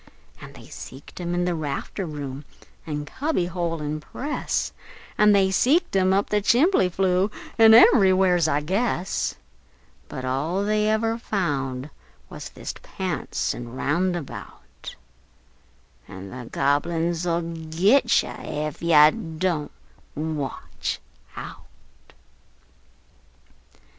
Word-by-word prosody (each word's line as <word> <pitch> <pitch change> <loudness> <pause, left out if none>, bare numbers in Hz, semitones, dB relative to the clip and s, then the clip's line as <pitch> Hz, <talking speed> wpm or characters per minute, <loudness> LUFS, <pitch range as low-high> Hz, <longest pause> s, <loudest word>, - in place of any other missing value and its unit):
An' - - -11
they - - -13
seeked 135 +7 -11
him 175 0 -2
in 175 0 +1
the 180 - 0
rafter 160 +4 -4
room, 145 -2 -6 0.4
an' 150 -1 -3
cubby 280 - -1
hole, 170 -3 -3
an' 150 +1 -3
press, 285 - -3 0.4
An' 210 0 +5 0.2
seeked 305 - +2
him 190 -1 +3
up 195 +1 +1
the 210 0 +2
chimbly 245 - +4
flue, 185 +2 +1 0.3
an' 225 0 +9
ever' 195 -5 +7
wheres, 180 -3 +3
I 145 -1 +1
guess; 190 +2 -1 0.7
But 130 - -6
all 150 +9 -1
they 210 +1 +1
ever 225 +1 0
found 140 - -2 0.4
wuz - - -7
thist - - -8
his - - -20
pants 180 -7 -2
an' 120 -1 -8
roundabout: 170 +2 -3 1.1
An' 95 0 -9
the 125 -2 -8
Gobble 145 +4 +1
uns 170 +1 -1
'll 170 0 +1
git 170 - +2
you - - -7
Ef 150 -1 -5
you 160 +2 +4
Don't 165 -4 -1 0.4
Watch 150 -4 -4 0.4
Out! - - -12
170 Hz, 120 wpm, -24 LUFS, 150-195 Hz, 1.1 s, an